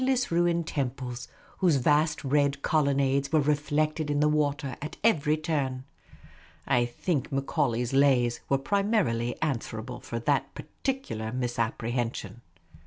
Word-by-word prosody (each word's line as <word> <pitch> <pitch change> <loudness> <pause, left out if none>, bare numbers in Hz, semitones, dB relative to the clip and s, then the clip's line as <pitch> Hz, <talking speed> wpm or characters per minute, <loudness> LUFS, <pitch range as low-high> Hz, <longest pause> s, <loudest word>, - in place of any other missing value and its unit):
ss 255 -5 +1
ruined 170 0 +2
temples, 125 -4 -4 0.3
whose 175 -5 +4
vast 150 +3 +2
red 140 0 +1
colon 140 -3 +2
nades 140 0 +1
were 160 - +4
reflected 150 +1 0
in 145 0 +1
the 150 - +4
water 145 -3 0
at 155 +2 -6
every 155 -9 +3
turn. 140 -5 -2 0.8
I 120 -1 +3
think 135 +4 -2
Macaulay's 135 -3 0
Lays 130 -4 +3
were 135 - +3
primarily 170 - 0
answerable 120 -4 -3
for 115 - -5
that 135 +3 0
particu 265 - -4
lar 110 0 -4
misapprehension. 120 -1 -2
140 Hz, 130 wpm, -28 LUFS, 125-155 Hz, 0.8 s, whose